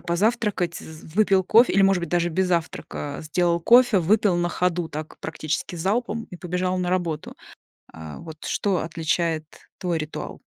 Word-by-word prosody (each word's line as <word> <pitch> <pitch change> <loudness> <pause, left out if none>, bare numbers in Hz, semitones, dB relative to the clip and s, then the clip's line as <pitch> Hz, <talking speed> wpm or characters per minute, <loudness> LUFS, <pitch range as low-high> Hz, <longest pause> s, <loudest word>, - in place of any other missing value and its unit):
позавтракать 195 -2 0
з 160 0 -11
выпил 195 -2 +4
кофе 230 +6 +5
или, 195 - +4
может 195 -2 +4
быть, 170 - -4
даже 175 +1 +1
без 185 +3 0
завтрака 160 -4 -3
сделал 170 +2 +1
кофе, 240 +1 +6
выпил 195 +1 +3
на 175 0 +1
ходу, 175 -2 -1
так 155 +1 -7
практически 155 +2 -4
залпом 220 +6 -1
и 180 - -8
побежал 180 +1 -2
на 180 - -1
работу. 175 -4 -2 0.6
Э, 80 -2 -9
вот 160 -2 -10
что 195 -3 0
отличает 165 0 -1 0.3
твой 175 -3 -1
ритуал? 155 0 -6
175 Hz, 160 wpm, -24 LUFS, 160-195 Hz, 0.6 s, кофе